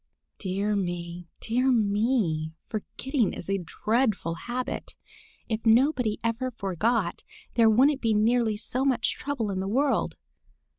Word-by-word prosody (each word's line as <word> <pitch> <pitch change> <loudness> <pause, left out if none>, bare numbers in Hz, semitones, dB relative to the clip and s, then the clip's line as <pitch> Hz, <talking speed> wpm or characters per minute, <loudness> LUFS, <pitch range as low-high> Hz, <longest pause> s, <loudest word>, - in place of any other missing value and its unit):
Dear 200 +2 -1
me, 175 -2 -3
dear 250 +4 +1
me! 205 -8 +1 0.2
Forgetting 235 +2 -1
is - - -8
a 195 - +1
dreadful 215 0 0
habit. 245 +9 -5 0.5
If 220 -1 -2
nobody 240 -1 +3
ever 230 +3 -1
forgot, 210 -2 -1 0.3
there 230 -2 +5
wouldn't 265 +6 +4
be 225 -2 +2
nearly 220 0 +2
so 250 +4 0
much 255 -4 +2
trouble 255 -8 -3
in 190 - -2
the 190 - -2
world. 270 +7 +1
220 Hz, 130 wpm, -27 LUFS, 195-250 Hz, 0.5 s, there